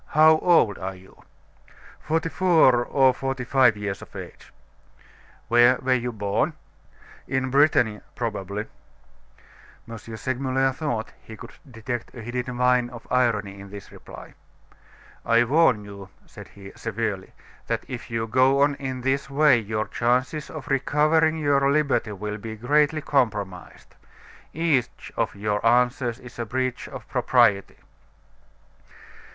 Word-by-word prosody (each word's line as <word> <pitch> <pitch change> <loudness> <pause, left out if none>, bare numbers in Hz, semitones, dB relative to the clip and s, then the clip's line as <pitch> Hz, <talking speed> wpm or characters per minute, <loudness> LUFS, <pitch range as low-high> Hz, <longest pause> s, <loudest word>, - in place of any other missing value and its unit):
"How 155 0 +7
old 165 - +3
are 95 0 -5
you?" 95 +1 -18 0.8
"Forty 165 +2 -1
four 160 -10 +4
or 130 0 +3
forty 135 -1 -4
five 125 -3 +3
years 105 -1 -4
of - - -14
age." - - -10 1.0
"Where 120 +2 +5
were 130 0 +1
you 125 -1 -1
born?" 105 +8 -1 0.7
"In 130 -1 -1
Brittany, 135 -7 +3
probably." 105 -3 -4 1.2
M. 115 - -8
Segmuller 130 +4 -2
thought 130 -5 -4
he 110 - -12
could - - -11 0.2
detect 120 +1 -6
a 120 - -8
hidden 125 +1 -4
vein 125 -1 +2
of 120 -1 -11
irony 105 -6 0
in 100 0 -11
this 100 -1 -11
reply. - - -12 0.9
"I 115 +1 +4
warn 125 -5 +3
you," 100 -1 -11 0.2
said - - -13
he, 100 -1 -13
severely, 110 -4 -4 0.3
"that - - -2
if 125 0 -7
you 115 -1 -2
go 130 +4 +3
on 145 0 +2
in 130 -2 -5
this 135 +3 -1
way 140 -3 +4
your 110 0 -3
chances 125 +5 -1
of 150 -3 -8
recovering 155 +4 +2
your 140 -2 +2
liberty 140 -7 0
will 105 +2 -5
be 110 +1 -7
greatly 150 +6 +1
compromised. 105 -10 -2 0.6
Each 150 -7 -1
of - - -1
your 105 0 -2
answers 120 0 +2
is 120 -1 -13
a 115 - -2
breach 130 +1 -3
of - - -10
propriety." 115 -6 +2
125 Hz, 135 wpm, -24 LUFS, 110-135 Hz, 1.2 s, How